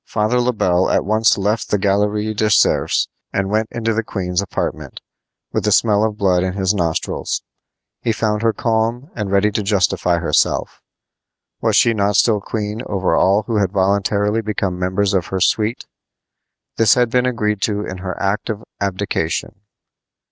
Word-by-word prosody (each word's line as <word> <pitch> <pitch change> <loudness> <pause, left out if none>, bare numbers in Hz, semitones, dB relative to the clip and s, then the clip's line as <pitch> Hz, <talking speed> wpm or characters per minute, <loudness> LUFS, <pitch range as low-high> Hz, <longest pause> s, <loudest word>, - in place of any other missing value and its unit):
Father 110 +3 +1
Le 125 +1 +1
Bel 95 -5 +1
at - - +1
once 110 +2 +3
left 105 +3 -1
the 105 - +2
Galerie 105 +2 0
des 110 0 0
Cerfs - - +2 0.2
and 100 0 -1
went 110 +1 +1
into 115 -1 -1
the 115 - 0
queen's 90 -4 -2
apartment, 100 - -4 0.5
with - - 0
the 105 - +1
smell 105 +1 +3
of 110 -1 -1
blood 95 -3 +2
in 90 0 -1
his 95 0 0
nostrils. 85 -5 -2 0.6
He 115 - 0
found 110 -1 -1
her 115 0 +3
calm 115 +5 -1
and 105 -3 -3
ready 100 +2 +3
to 105 - -1
justify 95 -3 +1
herself. 80 -3 0 0.8
Was - - +1
she 115 - +4
not 100 -1 0
still 105 0 +3
queen 105 +1 -4
over 95 -4 0
all 100 +5 +3
who 110 +1 -2
had 100 -2 0
voluntarily 100 +2 +1
become 100 -4 -3
members 95 +2 0
of 95 -3 0
her 95 - -3
suite? 110 +5 0 0.9
This 115 -3 +5
had 120 -2 +1
been 125 0 +2
agreed 105 -4 -1
to 105 -1 -1
in 95 0 -6
her 95 0 -5
act 100 +4 -1
of 110 0 -4 0.2
abdication. 100 -4 -2
105 Hz, 170 wpm, -19 LUFS, 95-110 Hz, 0.9 s, This